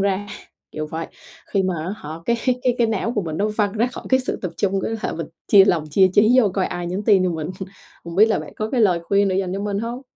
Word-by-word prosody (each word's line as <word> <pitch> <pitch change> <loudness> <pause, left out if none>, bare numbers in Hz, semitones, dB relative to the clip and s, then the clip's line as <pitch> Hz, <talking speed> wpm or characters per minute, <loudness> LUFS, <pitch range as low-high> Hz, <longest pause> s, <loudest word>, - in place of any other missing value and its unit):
ra, 200 +1 0 0.5
kiểu 155 0 -4
vậy. 160 +2 -5 0.4
Khi 195 -2 0
mà 185 -1 0
á 190 - -3
hả 150 - -9 0.2
cái 235 - +2 0.3
cái 250 -1 +2
cái 235 - +3
não 225 +1 -1
của 210 - -1
mình 160 -3 -4
nó 210 +2 +1
văng 205 -2 +1
ra 225 +3 +1
khỏi 250 - -8
cái 260 0 +3
sự 255 - -3
tập 180 - -3
trung, 195 -1 0
cái - - -2
là - - -2
mình 165 - -5 0.2
chia 195 -2 +8
lòng 165 -6 +1
chia 190 +3 +5
chí 220 +5 +5
vô 210 - +3
coi 190 -2 +1
ai 175 0 -4
nhắn 185 +4 -3
tin 195 -4 +4
cho 180 - +1
mình? 160 -1 -4 0.5
Hông 170 - -7
biết 215 +3 +7
là 220 - +1
bạn - - -9
có 215 0 -3
cái 255 - +1
lời 180 -4 +3
khuyên 200 +1 +2
để 185 - 0
dành 190 -2 -1
cho 195 - -3
mình 200 -1 -2
hông? 235 +4 -4
200 Hz, 285 wpm, -21 LUFS, 180-220 Hz, 0.5 s, chia